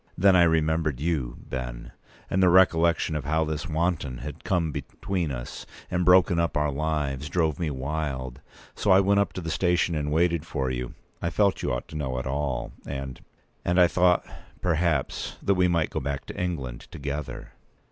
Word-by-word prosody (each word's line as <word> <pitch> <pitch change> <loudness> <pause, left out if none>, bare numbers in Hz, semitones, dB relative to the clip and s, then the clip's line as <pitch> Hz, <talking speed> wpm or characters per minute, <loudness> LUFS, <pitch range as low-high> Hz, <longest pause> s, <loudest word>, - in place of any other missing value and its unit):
Then 95 +1 +5
I 90 - +6
remembered 80 -4 +2
you, 75 -6 -1
Ben; - - -5 0.4
and 95 - +1
the 90 - +6
recollection 85 -3 +4
of 75 - -2
how 80 +2 +2
this 75 -1 -3
wanton 80 -5 -1
had 75 +4 -8
come 85 -5 0
between 90 +3 -3
us - - -6 0.2
and 90 0 +1
broken 90 -1 +5
up 85 -4 0
our 75 -1 +1
lives 75 -1 -2
drove 80 -4 0
me 85 -3 0
wild. 65 -2 -3 0.3
So - - -2
I 95 0 +7
went 100 +1 +3
up 100 - +1
to 95 - -5
the 80 -1 -4
station 90 0 +1
and 75 -2 -1
waited 85 0 +2
for 70 -5 -2
you. 60 -1 -4 0.3
I 85 - 0
felt 100 +3 +2
you - - -1
ought 60 - -3
to - - -9
know 65 -4 -2
it 65 - -3
all; 70 0 -2 0.2
and—and 70 +6 -4
I 90 - +8
thought, 90 +1 +3 0.3
perhaps, 80 -4 0
that 100 - +3
we 90 -1 +3
might 85 -2 +1
go - - -1
back 70 -1 -4
to - - -8
England 70 -9 -4
together." 70 -2 -5
80 Hz, 185 wpm, -26 LUFS, 70-85 Hz, 0.4 s, I